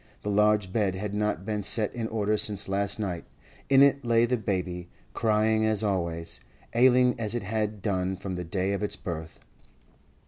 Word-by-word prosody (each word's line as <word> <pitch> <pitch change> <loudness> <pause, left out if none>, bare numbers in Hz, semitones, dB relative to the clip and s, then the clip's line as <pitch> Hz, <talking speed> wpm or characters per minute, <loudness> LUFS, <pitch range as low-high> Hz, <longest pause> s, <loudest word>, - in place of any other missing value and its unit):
The 105 - -1
large 105 -2 +2
bed 100 -4 +1
had 100 +1 -4
not 105 -3 -1
been 105 -1 -2
set 105 +1 -1
in 115 -2 -3
order 110 -1 0
since 105 -1 +1
last 100 +2 0
night; 90 -5 -3 0.5
in 135 0 +7
it 140 0 +3
lay 115 -1 +3
the 125 +1 +1
baby, 90 -5 -3 0.2
crying 110 0 +2
as 110 -1 +2
always, 85 -4 -2 0.3
ailing 125 +1 +5
as 110 0 -1
it 120 - -2
had 105 -1 -2
done 95 -2 0
from 95 0 -5
the 90 -1 -4
day 95 +3 -1
of 100 - -2
its 105 - -2
birth. 80 -2 -6
105 Hz, 180 wpm, -27 LUFS, 95-110 Hz, 0.5 s, in